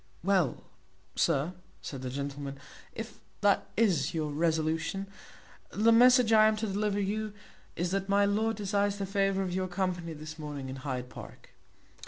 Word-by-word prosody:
"Well, 185 Hz, -8 st, +1 dB, 0.5 s
sir," 165 Hz, +1 st, +1 dB, 0.3 s
said 135 Hz, -3 st, -6 dB
the 130 Hz, -, -4 dB
gentleman, 140 Hz, +1 st, -5 dB, 0.4 s
"if 225 Hz, 0 st, -7 dB, 0.2 s
that 205 Hz, -1 st, +3 dB
is 180 Hz, -11 st, +2 dB
your 155 Hz, -2 st, -1 dB
resolution, 160 Hz, +4 st, 0 dB, 0.6 s
the 220 Hz, +3 st, +3 dB
message 245 Hz, 0 st, +6 dB
I 215 Hz, 0 st, +7 dB
am 215 Hz, -, +2 dB
to 215 Hz, +1 st, -2 dB
deliver 205 Hz, 0 st, -1 dB
to 205 Hz, -, +1 dB
you 215 Hz, +1 st, -2 dB, 0.4 s
is 175 Hz, +1 st, -1 dB
that 195 Hz, 0 st, -1 dB
my 200 Hz, 0 st, +4 dB
lord 220 Hz, +2 st, +1 dB
desires 205 Hz, 0 st, 0 dB
the 200 Hz, -, -2 dB
favour 195 Hz, 0 st, +1 dB
of 180 Hz, -2 st, -3 dB
your 185 Hz, 0 st, -1 dB
company 180 Hz, -2 st, -2 dB
this 155 Hz, +1 st, -9 dB
morning 145 Hz, -3 st, -5 dB
in 130 Hz, -, -6 dB
Hyde 130 Hz, -2 st, -4 dB
Park." -, -, -11 dB
190 Hz, 165 wpm, -30 LUFS, 155-205 Hz, 0.6 s, I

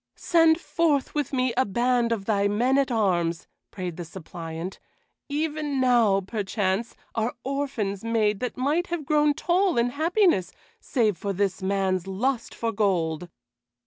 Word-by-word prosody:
"Send 325 Hz, -1 st, +4 dB
forth 315 Hz, -6 st, 0 dB
with 295 Hz, -3 st, -1 dB
me 255 Hz, -3 st, +1 dB
a 260 Hz, -, +3 dB
band 240 Hz, +2 st, +1 dB
of 210 Hz, -4 st, -1 dB
thy 200 Hz, -2 st, +2 dB
men 245 Hz, +7 st, +2 dB
at 275 Hz, -, +1 dB
arms," 175 Hz, -7 st, +1 dB, 0.2 s
prayed 180 Hz, -4 st, -5 dB
the 175 Hz, -, -4 dB
suppliant. 165 Hz, 0 st, -7 dB, 0.5 s
"Even 295 Hz, -1 st, -1 dB
now, 235 Hz, -6 st, +4 dB
perchance, 200 Hz, +1 st, -2 dB, 0.2 s
are 225 Hz, +1 st, -1 dB
orphans 260 Hz, -8 st, -2 dB
made 215 Hz, -3 st, +1 dB
that 250 Hz, -, -4 dB
might 295 Hz, +7 st, +1 dB
have 340 Hz, -4 st, -3 dB
grown 295 Hz, 0 st, +3 dB
tall 360 Hz, 0 st, +1 dB
in 235 Hz, +1 st, +2 dB
happiness 330 Hz, -, +2 dB, 0.3 s
save 220 Hz, -8 st, 0 dB
for 200 Hz, -1 st, -2 dB
this 195 Hz, 0 st, -1 dB
man's 190 Hz, -1 st, 0 dB
lust 235 Hz, +6 st, -2 dB
for 230 Hz, -1 st, -1 dB
gold." 180 Hz, -6 st, 0 dB
230 Hz, 145 wpm, -25 LUFS, 195-280 Hz, 0.5 s, Send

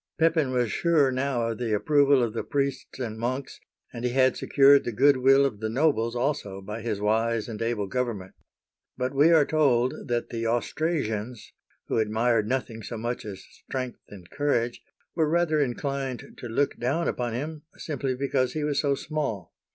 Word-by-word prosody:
Pepin 160 Hz, -4 st, +2 dB
was 125 Hz, -4 st, 0 dB
sure 155 Hz, -6 st, +3 dB
now 130 Hz, -2 st, -1 dB
of 115 Hz, 0 st, -4 dB
the 115 Hz, -3 st, 0 dB
approval 140 Hz, +4 st, +4 dB
of 115 Hz, -2 st, -2 dB
the 115 Hz, -, -3 dB
priests 140 Hz, -1 st, -2 dB
and 110 Hz, -4 st, -5 dB
monks, 130 Hz, +3 st, -3 dB, 0.3 s
and 120 Hz, -, -6 dB
he 125 Hz, -, +1 dB
had 130 Hz, +1 st, +3 dB
secured 140 Hz, 0 st, +5 dB
the 120 Hz, -, -3 dB
good 135 Hz, +5 st, +4 dB
will 135 Hz, +2 st, +5 dB
of 115 Hz, -7 st, -2 dB
the 110 Hz, 0 st, -2 dB
nobles 120 Hz, -2 st, +1 dB
also 120 Hz, -7 st, -2 dB
by 105 Hz, +4 st, -7 dB
his 110 Hz, -3 st, -2 dB
wise 110 Hz, +1 st, +1 dB
and 115 Hz, -2 st, -6 dB
able 115 Hz, -3 st, -1 dB
government. 110 Hz, -4 st, -3 dB, 0.6 s
But 130 Hz, +1 st, -2 dB
we 145 Hz, +4 st, +5 dB
are 160 Hz, -3 st, +5 dB
told 130 Hz, -6 st, +1 dB
that 120 Hz, -1 st, -1 dB
the 115 Hz, -1 st, -3 dB
Austrasians 120 Hz, -3 st, -2 dB
— -, -, -41 dB
who -, -, 0 dB
admired 110 Hz, 0 st, +1 dB
nothing 120 Hz, -2 st, -2 dB
so 115 Hz, +2 st, -6 dB
much 120 Hz, +1 st, -4 dB
as 100 Hz, -3 st, -7 dB
strength 130 Hz, -2 st, -6 dB
and 95 Hz, -4 st, -12 dB
courage 120 Hz, -5 st, 0 dB, 0.2 s
— -, -, -43 dB
were 160 Hz, -3 st, +2 dB
rather 165 Hz, -2 st, +2 dB
inclined 135 Hz, -1 st, -3 dB
to 120 Hz, -, -7 dB
look 140 Hz, +5 st, 0 dB
down 140 Hz, +8 st, 0 dB
upon 120 Hz, -2 st, -2 dB
him 150 Hz, +5 st, -4 dB, 0.2 s
simply 135 Hz, -4 st, -3 dB
because 130 Hz, -1 st, 0 dB
he 155 Hz, -, -2 dB
was 145 Hz, -1 st, 0 dB
so 140 Hz, -2 st, +1 dB
small. 140 Hz, -, -4 dB
125 Hz, 185 wpm, -26 LUFS, 115-140 Hz, 0.6 s, secured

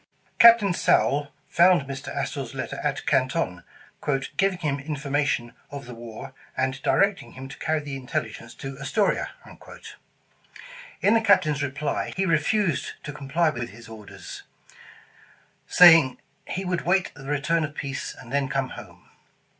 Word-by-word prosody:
Captain 230 Hz, -5 st, +7 dB
Sowle 145 Hz, -4 st, +2 dB, 0.2 s
found 175 Hz, -2 st, +4 dB
Mr. 135 Hz, -1 st, -7 dB
Astor -, -, -3 dB
's -, -, -10 dB
letter -, -, -5 dB
at -, -, -2 dB
Canton, 130 Hz, -, 0 dB, 0.4 s
''giving 175 Hz, +7 st, -1 dB
him 145 Hz, -3 st, -1 dB
information 140 Hz, -4 st, -2 dB, 0.2 s
of 140 Hz, -2 st, -8 dB
the 125 Hz, -, -9 dB
war, 120 Hz, +3 st, -9 dB, 0.2 s
and 130 Hz, +1 st, -1 dB
directing 200 Hz, +6 st, +1 dB
him 130 Hz, +1 st, -8 dB
to -, -, -11 dB
carry 155 Hz, -1 st, 0 dB
the 145 Hz, -1 st, -6 dB
intelligence 125 Hz, -4 st, -5 dB
to 135 Hz, 0 st, -8 dB
Astoria." 140 Hz, +10 st, 0 dB, 1.7 s
In 205 Hz, -, +4 dB
the 230 Hz, -, +4 dB
Captain's 175 Hz, -9 st, +3 dB
reply, 145 Hz, +1 st, -2 dB
he 195 Hz, -, +1 dB
refused 165 Hz, +1 st, +1 dB
to 145 Hz, -, -6 dB
comply 150 Hz, +3 st, 0 dB
with 120 Hz, -2 st, -5 dB
his 115 Hz, +2 st, -13 dB
orders, 110 Hz, -2 st, -10 dB, 1.3 s
saying, 165 Hz, -7 st, +7 dB, 0.3 s
''he 190 Hz, +2 st, -4 dB
would 180 Hz, -2 st, -1 dB
wait 190 Hz, +2 st, +1 dB
the 135 Hz, -1 st, -12 dB
return 150 Hz, +3 st, 0 dB
of 150 Hz, -1 st, -5 dB
peace, 140 Hz, -3 st, -5 dB
and 120 Hz, -, -11 dB
then 140 Hz, -1 st, +1 dB
come 135 Hz, -2 st, -1 dB
home." -, -, -12 dB
145 Hz, 145 wpm, -25 LUFS, 135-170 Hz, 1.7 s, Captain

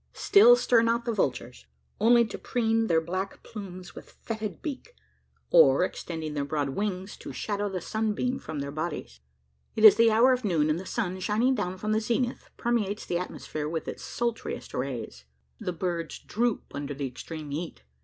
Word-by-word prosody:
Still 435 Hz, +4 st, +7 dB
stir 245 Hz, -, +3 dB
not 230 Hz, +1 st, +1 dB
the 235 Hz, -, 0 dB
vultures: 125 Hz, -, -2 dB, 0.3 s
only 235 Hz, +2 st, +5 dB
to 215 Hz, -, -7 dB
preen 225 Hz, -2 st, +1 dB
their 165 Hz, -4 st, +4 dB
black 185 Hz, +4 st, -4 dB
plumes 185 Hz, -5 st, -9 dB
with -, -, -11 dB
fetid 215 Hz, -5 st, -6 dB
beak; 315 Hz, -, -6 dB, 0.6 s
or, -, -, +6 dB
extending 160 Hz, -3 st, -4 dB
their 145 Hz, -1 st, -1 dB
broad 145 Hz, -1 st, -1 dB
wings, 190 Hz, +4 st, -3 dB
to -, -, -8 dB
shadow 205 Hz, -1 st, -2 dB
the 185 Hz, -2 st, -4 dB
sunbeam 220 Hz, +6 st, -1 dB
from 150 Hz, -3 st, -5 dB
their 140 Hz, 0 st, -4 dB
bodies. 155 Hz, -, -5 dB, 0.6 s
It 220 Hz, -, +4 dB
is 210 Hz, -1 st, +10 dB
the 230 Hz, 0 st, +6 dB
hour 235 Hz, +4 st, +5 dB
of 250 Hz, 0 st, -2 dB
noon; 160 Hz, -7 st, +2 dB
and 155 Hz, -, 0 dB
the 185 Hz, -, -8 dB
sun, 190 Hz, -5 st, -2 dB
shining 220 Hz, +7 st, +2 dB
down 185 Hz, -6 st, -2 dB
from 215 Hz, +3 st, -3 dB
the 215 Hz, 0 st, +2 dB
zenith, 240 Hz, +2 st, -1 dB
permeates 220 Hz, -4 st, -1 dB
the 175 Hz, -, -1 dB
atmosphere 155 Hz, -4 st, -5 dB
with 160 Hz, 0 st, -3 dB
his -, -, -6 dB
sultriest 235 Hz, -1 st, -4 dB
rays. 120 Hz, -, -4 dB, 0.3 s
The 200 Hz, -5 st, -3 dB
birds 170 Hz, -1 st, -3 dB
droop 235 Hz, 0 st, -2 dB
under 145 Hz, 0 st, -4 dB
the 140 Hz, 0 st, -3 dB
extreme 150 Hz, +4 st, -7 dB
heat. 155 Hz, -, -5 dB
200 Hz, 180 wpm, -28 LUFS, 160-230 Hz, 0.6 s, is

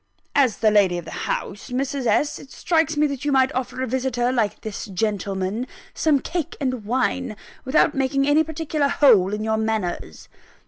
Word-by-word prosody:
"As 260 Hz, -6 st, +3 dB
the 215 Hz, -2 st, +3 dB
lady 195 Hz, -4 st, +3 dB
of 175 Hz, -, -6 dB
the -, -, -8 dB, 0.2 s
house, 205 Hz, -, -4 dB
Mrs. 265 Hz, 0 st, -2 dB
S., 230 Hz, +7 st, +1 dB
it 270 Hz, -, -13 dB
strikes 320 Hz, -1 st, 0 dB
me 300 Hz, -, +4 dB
that 280 Hz, -2 st, -3 dB
you 290 Hz, -, 0 dB
might 265 Hz, -1 st, +3 dB
offer 255 Hz, 0 st, -3 dB
a -, -, -2 dB
visitor, 250 Hz, 0 st, 0 dB
like 230 Hz, -5 st, -1 dB
this 215 Hz, -2 st, -5 dB
gentleman, 200 Hz, +2 st, -2 dB, 0.3 s
some 300 Hz, -3 st, +2 dB
cake 335 Hz, +2 st, -4 dB
and 255 Hz, -5 st, -2 dB
wine, 255 Hz, 0 st, -1 dB, 0.3 s
without 290 Hz, +3 st, +3 dB
making 275 Hz, +1 st, +1 dB
any 300 Hz, +2 st, +4 dB
particular 310 Hz, -2 st, -1 dB
hole 230 Hz, -10 st, +4 dB
in 210 Hz, +1 st, -3 dB
your 220 Hz, 0 st, 0 dB
manners!" 215 Hz, -, -3 dB
255 Hz, 180 wpm, -23 LUFS, 215-280 Hz, 0.3 s, me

